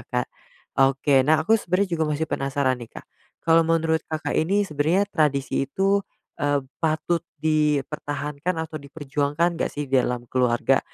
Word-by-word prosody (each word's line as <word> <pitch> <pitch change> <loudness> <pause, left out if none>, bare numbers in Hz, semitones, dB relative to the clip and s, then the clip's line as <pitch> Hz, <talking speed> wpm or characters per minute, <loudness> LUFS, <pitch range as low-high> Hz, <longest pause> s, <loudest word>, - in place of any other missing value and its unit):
Kak. 125 0 -1 0.5
Oke, 135 +1 +4
nah 155 +4 +3
aku 225 +4 +4
sebenarnya 195 +1 0
juga - - +3
masih 150 +1 0
penasaran 135 -3 -1
nih, 120 - -8
Kak, - - -9 0.4
kalau 165 +1 +5
menurut 165 -1 +1
Kakak 155 -2 -3
ini 195 +6 +2
sebenarnya 160 +3 +1
tradisi 140 -3 +1
itu, 195 +6 +2 0.4
eee, 145 -1 +1 0.2
patut 160 +1 0 0.2
dipertahankan 150 +1 -1
atau 155 -1 -7
diperjuangkan 145 +3 -1
nggak - - +1
sih 145 - -4
di 135 -1 +3
dalam 125 -1 -2
keluarga? 125 +1 +2
150 Hz, 150 wpm, -24 LUFS, 140-160 Hz, 0.5 s, kalau